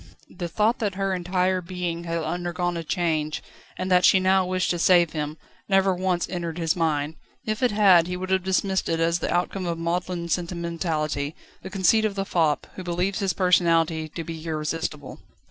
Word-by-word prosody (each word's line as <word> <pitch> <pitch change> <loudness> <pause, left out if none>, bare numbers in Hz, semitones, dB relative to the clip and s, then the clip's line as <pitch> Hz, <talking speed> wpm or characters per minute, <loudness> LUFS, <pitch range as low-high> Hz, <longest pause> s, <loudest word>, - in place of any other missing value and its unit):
The 175 - -4
thought 215 +7 +1
that 205 -5 -1
her 195 0 -1
entire 185 +1 0
being 175 -1 -4
had 165 -1 -2
undergone 175 +1 -2
a 165 - -3
change, 155 -2 -1 0.3
and 185 +1 -3
that 180 0 +5
she 190 - +6
now 190 0 +3
wished 185 0 0
to 175 - -2
save 175 -2 +5
him, 150 0 -4 0.3
never 195 -1 +4
once 180 -1 0
entered 170 -2 -4
his 165 -2 0
mind; 155 -2 -1 0.3
if 215 +2 -2
it 250 - +4
had, 195 -6 +5
he 180 0 -3
would 185 +1 -5
have 190 -1 +2
dismissed 190 0 0
it 165 - 0
as 165 +1 +2
the - - -2
outcome 180 +1 -1
of 170 -1 -2
maudlin 170 +1 -2
sentimentality, 170 -4 -2 0.3
the 190 - -7
conceit 195 +3 +3
of 205 -2 -1
the 195 -1 -2
fop, 160 -5 +1
who 185 - -7
believes 180 +3 -1
his 195 -2 0
personality 165 -3 +2
to 165 +2 -6
be 160 0 -7
irresistible. 155 -2 -4
175 Hz, 190 wpm, -25 LUFS, 165-185 Hz, 0.3 s, she